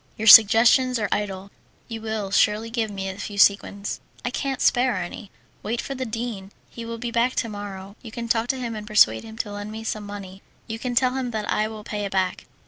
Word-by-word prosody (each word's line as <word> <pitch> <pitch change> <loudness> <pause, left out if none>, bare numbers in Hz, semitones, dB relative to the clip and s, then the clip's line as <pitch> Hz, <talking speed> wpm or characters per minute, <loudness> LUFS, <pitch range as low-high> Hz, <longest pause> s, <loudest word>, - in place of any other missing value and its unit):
"Your 220 - -3
suggestions 230 +4 +8
are 215 - -1
idle; 200 -1 -3 0.4
you 225 -1 -6
will 220 -3 -4
surely 215 +2 +2
give 225 -2 -1
me 195 -1 -5
a 190 +1 -6
few 205 0 -6
sequins." 200 0 +2 0.3
"I 250 - -1
can't 270 0 -3
spare 245 -1 +3
any." 185 +3 -6 0.3
"Wait 230 +3 -3
for 275 - -4
the 260 -2 -4
dean. 220 -4 -5 0.2
He 235 - -8
will 230 0 -5
be 240 0 -4
back 240 +2 +1
to 230 - -1
morrow. 200 -1 -8
You 230 - -9
can 235 +1 -5
talk 230 0 +1
to 265 - -1
him 235 -3 -4
and 210 -1 -7
persuade 110 - +4
him 220 0 -11
to 210 - -3
lend 205 +1 -6
me 220 +1 -7
some 215 -2 -4
money. 195 -2 -9 0.2
You 225 0 -6
can 245 0 -3
tell 255 0 +3
him 260 -2 -2
that 215 -3 -4
I 215 - +1
will 215 -1 -9
pay 210 -1 -4
it 200 - -5
back." 185 -1 -1
220 Hz, 230 wpm, -24 LUFS, 205-235 Hz, 0.4 s, suggestions